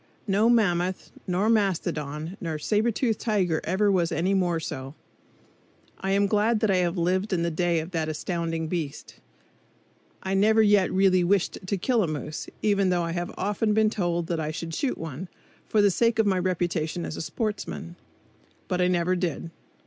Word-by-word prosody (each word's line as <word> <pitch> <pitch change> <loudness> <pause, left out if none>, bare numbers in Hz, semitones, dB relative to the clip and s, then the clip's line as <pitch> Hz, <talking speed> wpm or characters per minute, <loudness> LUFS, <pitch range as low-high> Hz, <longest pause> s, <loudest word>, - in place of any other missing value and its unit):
No 210 +2 +3
mammoth, 185 -6 +1 0.2
nor 185 +3 +1
mastodon, 165 -6 0
nor 165 -4 -3
sabretoothed 220 - 0
tiger 185 -8 0
ever 200 +4 +2
was 175 -3 +1
any 180 +5 +1
more 175 -3 +1
so. 135 -3 -6 1.0
I 195 - -3
am 200 +1 +3
glad 215 +2 +2
that 220 - +3
I 190 - +3
have 180 0 0
lived 185 +4 0
in 175 -3 +1
the 170 - 0
day 170 0 +1
of 160 +3 -6
that 160 -2 -1
astounding 165 0 -2
beast. 155 -4 -5 1.0
I 190 - -2
never 220 +3 +4
yet 205 -2 +4
really 185 -1 +4
wished 190 +1 +1
to 200 - 0
kill 235 +5 +1
a 185 - +1
moose, 150 0 -5
even 200 -2 +3
though 175 -1 +1
I 165 - -2
have 175 +1 -3
often 210 +2 0
been 215 -1 +3
told 175 -4 -1
that 170 -1 -2
I 155 -1 -2
should 165 +1 -5
shoot 260 - -1
one, 165 +2 -6 0.4
for 210 -1 +3
the 200 - +5
sake 230 +4 +2
of 220 - +3
my 190 -2 +2
reputation 175 -2 -1
as - - -5
a - - -5
sportsman. 205 -2 -4 0.7
But 180 -1 0
I 180 - +4
never 180 0 +1
did. 170 -2 -3
180 Hz, 180 wpm, -26 LUFS, 170-205 Hz, 1.0 s, the